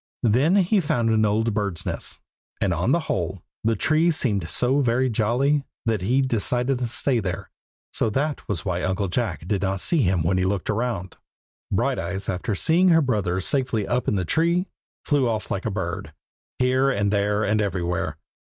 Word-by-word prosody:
Then 130 - +3
he 200 +2 +3
found 120 -7 +1
an 110 -1 +3
old 110 +2 +1
bird's 100 -5 -2
nest; - - -3 0.4
and - - +1
on - - 0
the - - +3
whole, - - -3 0.2
the 115 0 +2
tree 155 - +2
seemed 105 - 0
so 130 +3 +2
very 125 -1 +2
"jolly" 125 +7 +1 0.2
that 110 -4 0
he 125 +8 +2
decided 125 +1 0
to 125 - -1
stay 125 +1 0
there; 95 -4 -4 0.4
so 115 - +3
that 145 +7 -2
was 95 -7 -2
why 90 -2 -1
Uncle 95 +1 -1
Jack 90 -5 -2
did 100 -1 0
not 95 0 -1
see 165 - +2
him 90 -6 +2
when 90 +3 +1
he - - +1
looked 95 -2 -1
round. 105 -5 -2 0.5
Brighteyes, 95 +3 -1
after 95 +3 -2
seeing 170 - +3
her 165 -1 +5
brother 100 -8 0
safely 115 -1 0
up 125 0 -1
in - - +2
the 95 -2 -1
tree, 170 - +2 0.4
flew 140 -5 +2
off 110 -2 -3
like 95 - -2
a - - +1
bird, 95 -4 -4 0.4
here 130 +1 +2
and 100 -5 0
there 105 +1 +1
and 105 +1 +1
everywhere. 90 -3 -2
110 Hz, 185 wpm, -24 LUFS, 95-130 Hz, 0.5 s, her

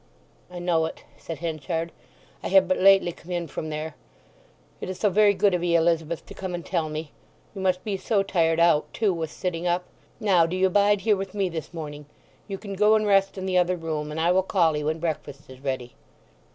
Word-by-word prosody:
"I 180 - -9
know 175 -2 +1
it," - - -10 0.2
said 165 - -6
Henchard. 165 +1 -3 0.5
"I - - -3
have 290 - +5
but 280 - +1
lately 195 -2 +5
come 165 - -16
in 175 -1 -1
from 155 +1 -6
there. 155 0 -4 0.9
It - - -6
is 185 - -4
so 210 - +2
very 205 +1 +4
good 195 0 +3
of 175 -1 0
'ee, 170 -1 +2
Elizabeth, 165 -1 +1
to - - -11
come 185 -2 -5
and 175 - -7
tell 155 -2 -1
me. 155 0 -5 0.4
You 195 - -6
must 185 -1 +1
be 205 -3 -2
so 200 +1 +1
tired 165 -4 +1
out, 170 -3 +3
too, 210 -4 +2
with 165 -2 -3
sitting 180 -2 -3
up. 175 +1 +1 0.4
Now 185 -7 +4
do 175 - -3
you 190 0 +3
bide 205 +1 +3
here 210 +1 +3
with 195 0 -6
me 195 -2 0
this 160 -3 -6
morning. 150 -3 -7 0.4
You 195 -2 -4
can 200 0 -7
go 210 +2 +4
and 215 -1 +2
rest 195 -1 +3
in 190 - -4
the 185 -1 +2
other 180 +1 +2
room; 155 -2 -3
and 155 +1 -4
I 170 +2 +3
will 185 +1 +4
call 175 -4 +2
'ee 150 - -2
when 155 +2 -1
breakfast 145 -4 -5
is 130 - -12
ready." 130 -3 -4
175 Hz, 230 wpm, -25 LUFS, 160-195 Hz, 0.9 s, have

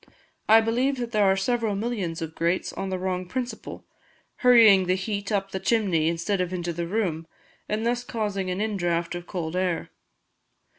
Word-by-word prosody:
I 220 +1 +8
believe 250 +5 0
that 240 -1 -4
there 210 -3 +3
are 190 0 +3
several 225 0 0
millions 195 -7 -3
of 160 0 -6
grates 170 +3 -1
on 195 - -4
the 185 - -2
wrong 185 0 -3
principle, 245 +6 -5 0.5
hurrying 220 -7 +6
the 185 - +3
heat 200 +1 -3
up 195 -1 -1
the 190 - -3
chimney 190 -8 +1
instead 170 +4 0
of 180 -1 -2
into 175 -2 -3
the 170 +1 -3
room, 170 -5 -2 0.4
and 215 +2 -1
thus 240 +1 0
causing 205 -6 -3
an 180 +1 -2
in 215 -1 -1
draught 170 -1 -1
of 175 0 -7
cold 170 -2 -4
air. 180 -2 -1
195 Hz, 185 wpm, -25 LUFS, 175-220 Hz, 0.5 s, I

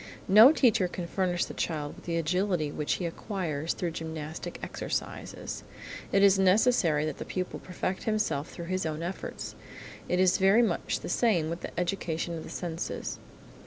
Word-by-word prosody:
No 215 +8 +9
teacher 235 -10 +3
can 175 0 -5
furnish 175 0 0
the - - -8
child 150 -3 -3
with - - -15
the 170 -1 -1
agility 175 -1 0
which 150 0 -1
he 180 - -2
acquires 165 -4 -2
through 175 -2 -2
gymnastic 160 -1 -5
exercises: - - -4 0.5
it 195 - +4
is 195 -1 +6
necessary 185 -5 +4
that 155 - -4
the - - -3
pupil 185 -1 -4
perfect 185 +1 -4
himself 175 -9 0
through 170 - -7
his 185 +2 -1
own 155 0 -3
efforts. 180 +3 -5 0.6
It 180 - +2
is 185 +2 +4
very 195 +5 +5
much 230 - -1
the - - -6
same 175 -10 +2
with 170 - -4
the - - -5
education 170 -2 -2
of 160 - -5
the - - -9
senses. 170 -1 -4
180 Hz, 170 wpm, -29 LUFS, 160-195 Hz, 0.6 s, No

